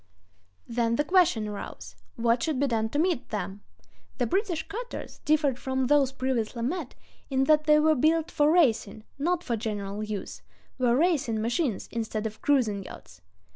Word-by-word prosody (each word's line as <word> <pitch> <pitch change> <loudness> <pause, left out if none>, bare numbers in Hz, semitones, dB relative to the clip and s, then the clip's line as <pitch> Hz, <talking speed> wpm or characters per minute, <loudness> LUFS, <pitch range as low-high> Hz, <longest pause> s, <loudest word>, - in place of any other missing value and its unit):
Then 230 -1 0
the 295 - +1
question 335 - +3
arose: 110 - -7 0.2
What 235 +1 +1
should 295 0 -1
be 285 - +3
done 225 -4 0
to 290 - -3
meet 325 -5 0
them? 200 -1 -4 0.6
The 245 - +1
British 350 - -1
cutters 475 +4 -7
differed 295 -4 +2
from 260 0 -1
those 275 0 +3
previously 250 -4 -2
met, 305 +1 -3 0.3
in 265 -1 +2
that 305 +2 +4
they 300 -1 +6
were 315 +1 +4
built 315 +4 +2
for 295 -1 +3
racing, 230 - +2 0.2
not 350 +4 0
for 235 - -1
general 210 -2 -4
use—were 215 +4 -3
"racing 280 -9 +1
machines" 235 - -1
instead 225 -1 -3
of 220 0 -5
cruising 225 -9 +1
yachts. 90 - -12
255 Hz, 160 wpm, -27 LUFS, 220-305 Hz, 0.6 s, they